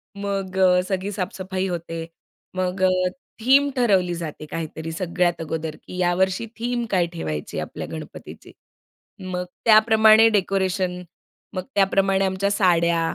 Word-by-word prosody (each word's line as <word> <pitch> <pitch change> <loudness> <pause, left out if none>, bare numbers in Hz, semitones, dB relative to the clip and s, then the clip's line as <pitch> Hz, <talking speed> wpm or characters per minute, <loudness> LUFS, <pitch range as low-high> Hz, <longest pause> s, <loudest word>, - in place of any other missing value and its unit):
मग 195 -2 -4
अ, 180 -1 +5
सगळी 190 +1 -2
साफ-सफाई 190 -1 -3
होते. 165 -2 -4 0.5
मग 185 0 -2
अ, 185 - +5 0.5
थीम 275 +4 +5
ठरवली 195 -8 +2
जाते 155 -2 -6
काहीतरी 160 0 -5
सगळ्यात 175 0 -1
अगोदर, 160 -1 -4
की 180 - -11
यावर्षी 185 +3 +1
थीम 240 0 -1
काय 180 -3 +3
ठेवायची 75 - -4
आपल्या - - -6
गणपतीची. - - -9 0.8
मग 180 0 -2 0.2
त्याप्रमाणे 220 0 +6
डेकोरेशन, 190 -3 0 0.5
मग 185 - -3
त्याप्रमाणे 195 0 +2
आमच्या 190 +1 0
साड्या 170 -4 +3
185 Hz, 125 wpm, -23 LUFS, 175-200 Hz, 0.8 s, त्याप्रमाणे